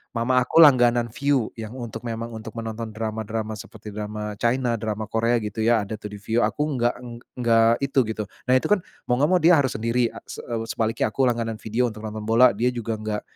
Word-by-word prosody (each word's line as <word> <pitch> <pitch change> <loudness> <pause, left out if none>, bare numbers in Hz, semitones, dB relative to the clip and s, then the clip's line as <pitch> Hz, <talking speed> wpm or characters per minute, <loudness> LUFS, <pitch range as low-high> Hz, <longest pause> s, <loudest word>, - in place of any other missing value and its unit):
mama 125 +2 +2
aku 130 +6 +6
langganan 120 -5 +5
Viu, 140 -3 0
yang 110 +2 -6
untuk 120 -4 -6
memang 115 0 -4
untuk 110 0 -8
menonton 115 0 -5
drama-drama 110 0 -3
seperti 105 +1 -10
drama 105 0 -5
China, 120 0 +1
drama 110 0 -3
Korea, 115 +2 +2
gitu 105 +1 -5
ya, 115 -2 +4
ada 105 +2 -6
tuh 105 - -6
di 105 - -6
Viu. 110 +3 0
Aku 150 - -1
enggak 120 0 +2
eng 120 -1 -8 0.2
enggak 115 -1 +4
itu, 140 0 +1
gitu. 110 -1 -3 0.2
Nah 125 - +4
itu 130 - +1
kan, 210 - +5 0.3
mau 125 - +3
enggak 150 +4 +3
mau 180 - +5
dia 175 - +7
harus 130 -2 0
sendiri 115 +2 +1
a - - -8
se - - -7 0.3
sebaliknya 115 0 0
aku 135 - +1
langganan 115 -2 -1
Vidio 120 +3 0
untuk 110 - -11
nonton 110 0 -5
bola, 115 +1 +5
dia 120 +4 +1
juga 115 -2 -3
nggak 105 -1 -3
115 Hz, 215 wpm, -24 LUFS, 110-125 Hz, 0.3 s, dia